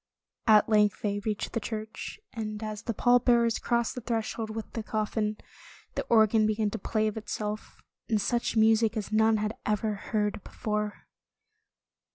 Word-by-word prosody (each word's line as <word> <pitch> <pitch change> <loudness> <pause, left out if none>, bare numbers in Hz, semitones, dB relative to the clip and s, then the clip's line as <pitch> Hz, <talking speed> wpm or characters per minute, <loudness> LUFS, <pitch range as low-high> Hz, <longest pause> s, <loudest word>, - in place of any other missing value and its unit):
At 215 -2 +6
length 210 -2 +3
they 205 -1 0
reached 210 0 -3
the 230 - 0
church, 220 - -6
and 215 -2 -4
as 215 -1 -4
the 230 - -3
pall 245 +3 +5
bearers 235 -2 +3
crossed 235 -1 0
the 250 - -6
threshold 225 -1 -2
with 220 0 -6
the 225 - -2
coffin, 215 0 -1 0.6
the - - -1
organ 220 -1 +5
began 215 -1 0
to - - -4
play 215 +2 0
of 215 0 -1
itself, 210 0 -5 0.3
and 220 -2 +2
such 235 +2 0
music 220 +1 +4
as 210 0 -4
none 220 +1 +4
had 215 +1 -2
ever 210 0 0
heard 210 0 -2
before. 210 -1 -3
215 Hz, 165 wpm, -28 LUFS, 210-225 Hz, 0.6 s, At